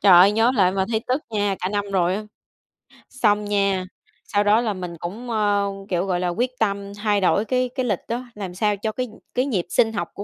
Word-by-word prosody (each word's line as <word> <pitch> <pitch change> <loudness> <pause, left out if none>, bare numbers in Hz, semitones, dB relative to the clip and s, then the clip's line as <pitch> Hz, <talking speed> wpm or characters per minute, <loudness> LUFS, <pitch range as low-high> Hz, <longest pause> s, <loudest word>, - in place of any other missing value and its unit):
Trời 195 - +6
ơi, 185 +4 +8
nhớ 225 +3 +3
lại 185 -4 +4
mà 190 -1 +1
thấy 220 - +1
tức 265 +4 +1
nha, 205 -2 0
cả 185 - -1
năm 205 0 -1
rồi 180 -1 +2
á. 215 - -3 0.9
Xong 210 -4 +1
nha, 200 -2 +1 0.4
sau 205 0 +1
đó 210 +3 +4
là 220 -4 -1
mình 180 -2 -6
cũng, 215 +8 -6
ơ, 205 -2 +2 0.2
kiểu, 180 0 0
gọi 180 -2 0
là, 180 - 0
quyết 240 +8 0
tâm 200 -2 -1
thay 205 -1 +1
đổi 200 +3 +3
cái 255 0 0
cái 255 -2 -1
lịch 205 -6 0
á, 245 +2 -3
làm 190 -4 -6
sao 210 +1 +1
cho 215 +2 -2
cái 250 +2 -3
nh 215 - -15 0.2
cái 255 +2 +2
nhịp 195 -11 -1
sinh 225 -2 +2
học 205 - -3
của 200 - -6
205 Hz, 240 wpm, -23 LUFS, 190-225 Hz, 0.9 s, ơi